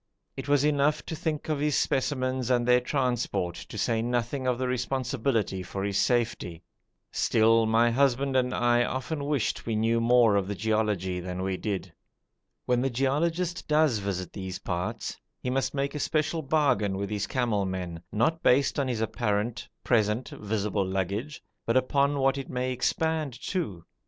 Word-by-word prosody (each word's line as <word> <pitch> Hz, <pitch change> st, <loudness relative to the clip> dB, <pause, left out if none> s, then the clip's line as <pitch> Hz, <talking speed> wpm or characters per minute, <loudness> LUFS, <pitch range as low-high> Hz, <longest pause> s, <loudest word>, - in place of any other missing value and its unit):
It -, -, -6 dB
was 145 Hz, -1 st, +3 dB
enough 150 Hz, 0 st, +2 dB
to 165 Hz, -, -4 dB
think 155 Hz, -1 st, -3 dB
of 155 Hz, -2 st, -1 dB
his 150 Hz, 0 st, +1 dB
specimens 130 Hz, -2 st, 0 dB
and 120 Hz, -1 st, +2 dB
their 125 Hz, 0 st, +6 dB
transport, 120 Hz, -, -1 dB
to 100 Hz, -, -9 dB
say 110 Hz, +2 st, +1 dB
nothing 120 Hz, +3 st, -1 dB
of 125 Hz, -1 st, +1 dB
the 130 Hz, 0 st, -1 dB
responsibility 125 Hz, -5 st, -1 dB
for 95 Hz, +2 st, -5 dB
his 100 Hz, -1 st, 0 dB
safety. 115 Hz, -9 st, 0 dB, 0.5 s
Still 115 Hz, 0 st, +3 dB
my 115 Hz, +2 st, +4 dB
husband 135 Hz, +1 st, +2 dB
and 125 Hz, -1 st, +2 dB
I 120 Hz, -1 st, +3 dB
often 140 Hz, +4 st, -3 dB
wished 145 Hz, -6 st, -1 dB
we 115 Hz, -, 0 dB
knew 115 Hz, +2 st, +2 dB
more 115 Hz, -3 st, +5 dB
of 100 Hz, 0 st, -2 dB
geology 105 Hz, -4 st, 0 dB
than 90 Hz, +1 st, -4 dB
we 95 Hz, 0 st, -1 dB
did. 95 Hz, -3 st, -4 dB, 0.7 s
When 125 Hz, -1 st, +2 dB
the 135 Hz, -, +1 dB
geologist 160 Hz, +8 st, 0 dB
does 150 Hz, -6 st, +3 dB
visit 95 Hz, -2 st, -4 dB
these 95 Hz, -1 st, -5 dB
parts 90 Hz, 0 st, -4 dB, 0.2 s
he 125 Hz, -, -3 dB
must 135 Hz, +2 st, -1 dB
make 140 Hz, 0 st, -1 dB
a 150 Hz, -, -4 dB
special 155 Hz, +2 st, 0 dB
bargain 135 Hz, -10 st, +1 dB
with 100 Hz, +1 st, -3 dB
his 105 Hz, -1 st, -1 dB
camel 115 Hz, -6 st, 0 dB
men, 90 Hz, -3 st, -4 dB
not 160 Hz, +10 st, +1 dB
based 140 Hz, +3 st, +3 dB
on 140 Hz, -, +1 dB
his 120 Hz, -3 st, -2 dB
apparent, 110 Hz, 0 st, -1 dB
present, 110 Hz, +1 st, +1 dB
visible 105 Hz, -2 st, -2 dB
baggage, 100 Hz, +10 st, -3 dB, 0.2 s
but 115 Hz, +2 st, +3 dB
upon 140 Hz, +2 st, +2 dB
what 135 Hz, 0 st, +2 dB
it 135 Hz, -, -7 dB
may 130 Hz, 0 st, -1 dB
expand 155 Hz, +1 st, -1 dB
to. 105 Hz, -, -3 dB
120 Hz, 165 wpm, -27 LUFS, 105-140 Hz, 0.7 s, their